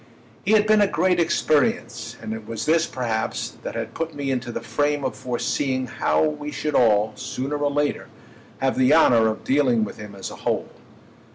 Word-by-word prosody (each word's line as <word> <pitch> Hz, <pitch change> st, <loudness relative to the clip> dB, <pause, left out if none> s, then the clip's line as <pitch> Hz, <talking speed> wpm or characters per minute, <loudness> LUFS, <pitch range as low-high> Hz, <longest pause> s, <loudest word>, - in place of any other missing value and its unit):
He 215 Hz, -, +2 dB
had 210 Hz, -1 st, +5 dB
been 215 Hz, 0 st, +4 dB
a 205 Hz, -, +5 dB
great 180 Hz, 0 st, +1 dB
experience, 155 Hz, -3 st, 0 dB
and 110 Hz, -, -4 dB
it 110 Hz, -1 st, -8 dB
was 115 Hz, -1 st, -4 dB
this 160 Hz, +1 st, +3 dB
perhaps 115 Hz, -4 st, -3 dB
that -, -, -6 dB
had -, -, -4 dB
put 165 Hz, -1 st, -4 dB
me 140 Hz, -1 st, -2 dB
into 125 Hz, -2 st, -2 dB
the -, -, -4 dB
frame 145 Hz, -1 st, -1 dB
of 125 Hz, -4 st, -2 dB
foreseeing 130 Hz, +3 st, -1 dB
how 80 Hz, -11 st, +1 dB
we 80 Hz, -, -2 dB
should 150 Hz, 0 st, -3 dB
all, 110 Hz, -4 st, +4 dB
sooner 135 Hz, +3 st, -4 dB
or 145 Hz, 0 st, 0 dB
later, 145 Hz, 0 st, -1 dB, 0.5 s
have 135 Hz, -1 st, 0 dB
the 130 Hz, +4 st, +5 dB
honour 120 Hz, -8 st, +5 dB
of 110 Hz, 0 st, -3 dB
dealing 130 Hz, -5 st, +2 dB
with 105 Hz, -, -6 dB
him 105 Hz, -1 st, -9 dB
as 95 Hz, -, -6 dB
a -, -, -9 dB
whole. -, -, -2 dB
130 Hz, 195 wpm, -23 LUFS, 110-150 Hz, 0.5 s, had